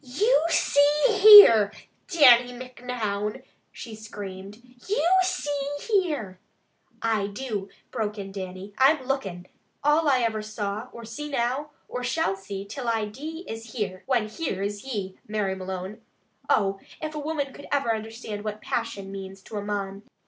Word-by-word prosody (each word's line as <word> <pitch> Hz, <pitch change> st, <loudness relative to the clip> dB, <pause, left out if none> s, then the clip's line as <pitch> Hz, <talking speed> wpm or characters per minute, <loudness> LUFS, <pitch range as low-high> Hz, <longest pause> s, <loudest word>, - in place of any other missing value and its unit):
"You 325 Hz, -, +2 dB
see 290 Hz, -1 st, +3 dB, 0.2 s
here, 380 Hz, -, +10 dB, 0.4 s
Dannie 250 Hz, -8 st, +6 dB
Micnoun!" 245 Hz, -3 st, -4 dB, 0.3 s
she 230 Hz, -, -9 dB
screamed. 200 Hz, -2 st, -8 dB, 0.3 s
"You 385 Hz, -5 st, +1 dB
see 290 Hz, -6 st, -2 dB
here 300 Hz, -, -1 dB, 0.3 s
" -, -, -45 dB, 0.2 s
"I 220 Hz, -3 st, +1 dB
do," 205 Hz, -2 st, -5 dB, 0.2 s
broke 215 Hz, -3 st, -3 dB
in 195 Hz, -1 st, -6 dB
Dannie. 190 Hz, +1 st, -7 dB
"I'm 270 Hz, +1 st, +5 dB
lookin'! 195 Hz, -10 st, -3 dB, 0.4 s
All 295 Hz, +1 st, +3 dB
I 260 Hz, -2 st, +3 dB
ever 220 Hz, -2 st, 0 dB
saw, 215 Hz, +2 st, -4 dB
or 235 Hz, -1 st, -10 dB
see 295 Hz, +7 st, -6 dB
now, 270 Hz, +2 st, -1 dB, 0.2 s
or 250 Hz, -, -5 dB
shall 250 Hz, -4 st, 0 dB
see 195 Hz, 0 st, -7 dB
till 245 Hz, +5 st, -6 dB
I 225 Hz, -2 st, +1 dB
dee 310 Hz, -, -7 dB
is 225 Hz, 0 st, -7 dB
'here,' 195 Hz, -6 st, -3 dB
when 240 Hz, -5 st, +1 dB
'here' 215 Hz, -, -3 dB
is 205 Hz, 0 st, -4 dB
ye, 200 Hz, -8 st, -5 dB
Mary 210 Hz, -2 st, -1 dB
Malone. 190 Hz, +1 st, -6 dB, 0.5 s
Oh! 195 Hz, -2 st, +2 dB, 0.2 s
If 310 Hz, -1 st, -5 dB
a 300 Hz, -, -4 dB
woman 295 Hz, -2 st, -2 dB, 0.2 s
ever 280 Hz, -4 st, +1 dB
could -, -, +4 dB
understand 220 Hz, -1 st, -6 dB
what 215 Hz, 0 st, -4 dB
passion 195 Hz, -2 st, -4 dB
means 195 Hz, 0 st, -8 dB
to 215 Hz, -, -7 dB
a -, -, -2 dB
mon! 200 Hz, -1 st, -4 dB
225 Hz, 155 wpm, -26 LUFS, 200-275 Hz, 0.5 s, here